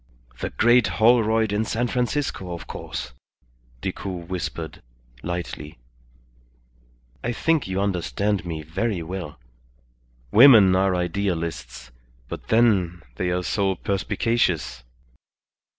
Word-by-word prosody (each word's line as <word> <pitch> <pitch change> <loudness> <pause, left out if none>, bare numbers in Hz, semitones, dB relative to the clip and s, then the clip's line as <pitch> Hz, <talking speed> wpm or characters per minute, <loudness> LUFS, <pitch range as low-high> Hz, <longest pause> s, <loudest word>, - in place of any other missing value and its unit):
"The - - -3
great 120 0 +4
Holroyd 110 -2 +4
in 105 +2 +1
San 115 +2 -1
Francisco, 120 -7 -2
of 85 - -9
course," - - -6 0.7
Decoud 90 -3 -5
whispered, 85 -3 -5 0.4
lightly. 85 -3 -5 1.5
"I 120 - -1
think 160 +2 +1
you 95 0 -2
understand 100 +1 -1
me 80 -3 -5
very 95 +3 -2
well. 85 -2 -6 0.9
Women 110 -6 +8
are 95 0 +2
idealists; 85 -9 -3 0.4
but - - -8
then 95 -7 +2
they 90 - -1
are 90 0 -1
so 95 0 0
perspicacious." 95 - -1
95 Hz, 105 wpm, -24 LUFS, 85-110 Hz, 1.5 s, Women